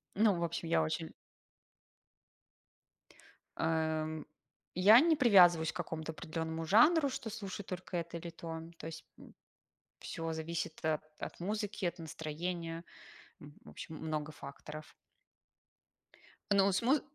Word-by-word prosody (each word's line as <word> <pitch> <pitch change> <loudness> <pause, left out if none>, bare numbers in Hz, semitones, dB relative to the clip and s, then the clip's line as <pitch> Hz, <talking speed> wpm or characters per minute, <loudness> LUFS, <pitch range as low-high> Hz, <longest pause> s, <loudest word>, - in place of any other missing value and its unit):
Ну, 210 -2 +4
в - - -1
общем, 170 0 -3
я 165 - +3
очень 160 +1 -3 2.4
Эм. 160 -1 0 0.5
Я 205 +7 +8
не 320 -1 +4
привязываюсь 175 - +6
к - - -25
какому-то 160 0 -4
определенному 160 0 -4
жанру, 280 - +6
что 235 -3 -5
слушаю 205 -2 -6
только 185 -1 -5
это 170 0 -4
или 170 +1 -6
то. 165 -1 -6 0.2
То - - -9
есть, 160 0 -8
м, - - -15 0.6
всё 165 0 -4
зависит 160 0 -4
от 155 -1 +1 0.2
от - - -6
музыки, 205 +1 -2
от 175 - -1
настроения, 165 +1 -4 0.6
м, 145 0 -12
в - - -11
общем, 160 -2 -8
много 155 -1 -3
факторов. 150 +2 -9 1.6
Но 200 0 +5
с 200 - +1
муз 265 +5 +3
165 Hz, 130 wpm, -34 LUFS, 160-195 Hz, 2.4 s, Я